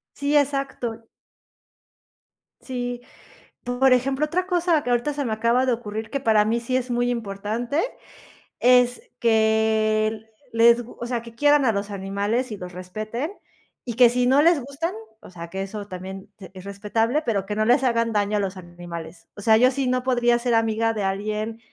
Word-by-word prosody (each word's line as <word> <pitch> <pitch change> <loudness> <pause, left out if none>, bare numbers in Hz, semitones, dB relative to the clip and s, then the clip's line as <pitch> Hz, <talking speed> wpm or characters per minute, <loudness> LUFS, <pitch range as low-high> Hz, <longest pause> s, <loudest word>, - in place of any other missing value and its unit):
Sí, 285 +1 0
exacto. 270 -5 -2 1.5
Sí. 245 -1 -5 0.6
Por 245 +2 +2
ejemplo, 265 +4 +2
otra 365 +4 -1
cosa 350 -4 +2
que 245 - -2
ahorita 245 +4 +1
se 285 0 -3
me 230 - -2
acaba 235 +4 +2
de 255 - +2
ocurrir, 220 -1 -5
que 275 - -2
para 220 -5 +3
mí 230 +2 0
sí 255 +2 -1
es 255 0 -2
muy 245 0 +1
importante, 230 +5 -2 0.8
es 245 0 +4 0.2
que 220 -1 +2 0.3
les 235 +1 +5
gu 235 - -13
o 240 - -4
sea, 240 -1 -2
que 230 0 -13
quieran 290 +2 +4
a 230 - +4
los 200 +1 -3
animales 200 +5 -2
y - - -6
los 180 -1 -8
respeten, 215 - -5 0.5
y 240 -3 -5
que 245 0 +7
si 245 +1 +1
no 270 +3 +5
les 330 -1 +4
gustan, 280 +6 -4 0.3
o - - -14
sea, 170 -2 -9
que 190 +2 -4
eso 200 +1 -6
también 190 +1 -8 0.2
es 185 -1 -10
respetable, 215 +7 -1
pero 205 -5 0
que 210 - -4
no 215 +1 +1
les 245 +4 +4
hagan 230 -2 +1
daño 205 0 +1
a - - +1
los 195 -1 -2
animales. 175 -2 -9
O - - -9
sea, 220 +1 +5
yo 250 +3 +5
sí 270 0 -2
no 255 0 0
podría 240 -2 +2
ser 240 0 0
amiga 225 0 +1
de 210 -2 -3
alguien, 210 +3 -2
230 Hz, 185 wpm, -23 LUFS, 210-255 Hz, 1.5 s, que